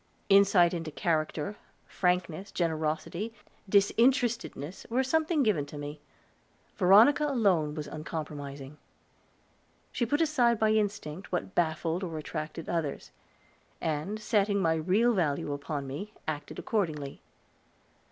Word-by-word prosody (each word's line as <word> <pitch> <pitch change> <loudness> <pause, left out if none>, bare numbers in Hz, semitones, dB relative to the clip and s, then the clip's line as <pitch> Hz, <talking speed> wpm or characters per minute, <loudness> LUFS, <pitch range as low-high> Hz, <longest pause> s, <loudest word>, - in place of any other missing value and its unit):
Insight 195 -3 +6
into 165 -2 -3
character, 155 +3 -1 0.3
frankness, 180 +1 -1
generosity, 165 +5 -2 0.3
disinterestedness, 220 - +1
were 250 +3 +2
sometimes 315 +1 +1
given 160 -10 +1
me. 145 +1 -7 0.7
Veronica 220 +11 +6
alone 190 - +2
was 150 -2 -4
uncompromising; 150 -3 -6 1.1
she 240 - -1
put 290 +5 +1
aside 260 -8 +3
by 215 0 +3
instinct 205 -5 -2
what 185 +1 -2
baffled 165 +2 0
or 165 -3 -4
attracted 155 +1 -5
others, 165 -5 -3 0.7
and, 160 +7 -2
setting 205 -2 +1
my 165 -4 +2
real 190 +9 +2
value 145 -6 0
upon 145 0 -4
me, 185 +11 -7
acted 145 -2 -4
accordingly. 155 -10 -2
175 Hz, 110 wpm, -29 LUFS, 155-215 Hz, 1.1 s, Insight